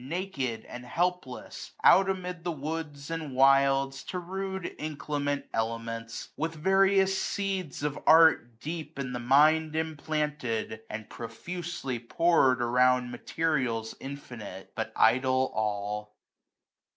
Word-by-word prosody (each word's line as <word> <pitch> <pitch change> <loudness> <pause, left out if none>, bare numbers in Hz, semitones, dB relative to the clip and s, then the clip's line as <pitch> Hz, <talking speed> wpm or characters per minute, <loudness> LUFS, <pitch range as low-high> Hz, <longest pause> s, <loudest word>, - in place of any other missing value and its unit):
Naked, 135 -7 -3
and 125 - -8
helpless, 175 -1 -3
out 195 +2 +7
amid 180 -2 -4
the 175 - -1
woods 150 -1 -5
And 155 -5 -4
wilds, 135 0 +4
to 185 - -4
rude 190 +1 -4
inclement 145 -2 -2
elements; 115 0 -3
With 165 +2 -3
various 195 +3 +3
seeds 190 -8 -3
of 150 -1 -2
art 160 -8 +6
deep 160 +2 -6
in 130 -2 -4
the 120 - -3
mind 150 +5 +4
50 - - -2
Implanted, 150 -8 -2
and 110 0 -6
profusely 160 0 -5
pour'd 130 -1 +3
around 125 +1 +3
Materials 125 -5 -1
infinite; 120 -8 -8
but - - -3
idle 130 +1 +3
all. 105 0 -2
140 Hz, 115 wpm, -29 LUFS, 125-165 Hz, -, out